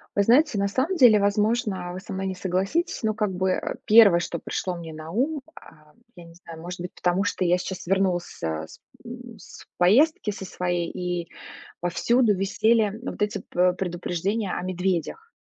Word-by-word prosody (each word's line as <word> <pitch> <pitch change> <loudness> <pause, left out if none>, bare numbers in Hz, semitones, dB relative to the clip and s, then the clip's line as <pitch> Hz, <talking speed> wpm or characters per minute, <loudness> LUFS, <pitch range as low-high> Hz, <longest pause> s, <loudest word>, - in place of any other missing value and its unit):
Вы 200 - +3
знаете, 255 +1 +4
на 200 - +1
самом 265 - -1
деле, 235 -7 +7
возможно, 205 -3 0
вы 185 - -7
со 215 - -10
мной 190 0 -3
не 190 - -3
согласитесь, 190 - -1
но, 220 -2 0
как 210 -2 -1
бы, 185 +1 0
э, - - -2
1, 210 -5 +7
что 170 -1 -4
пришло 180 +3 -3
мне 165 -2 -8
на 155 +1 -9
ум, 275 - -1
а 155 -1 -17 0.2
я 175 - -11
не 170 - -15
знаю, 165 -2 -11
может 175 +1 -7
быть, 180 - -6
потому 180 +2 0
что 185 -1 -1
я 175 +1 +3
сейчас 180 0 -6
вернулась 190 -2 +1
с - - -14
а, 80 -1 -3
с - - -15 0.3
м, 240 -1 -10 0.4
поездки 220 - +3
со 195 - -8
своей, 175 -2 -2
и 175 -1 -4 0.5
повсюду 210 +6 +2
висели, 215 +3 +2
м, 210 +2 -7
вот - - -6
эти, 210 0 0
п - - -9
э, - - -8
предупреждения 180 +3 -2
о - - -3
медведях. 185 - -2
190 Hz, 195 wpm, -25 LUFS, 175-220 Hz, 0.5 s, деле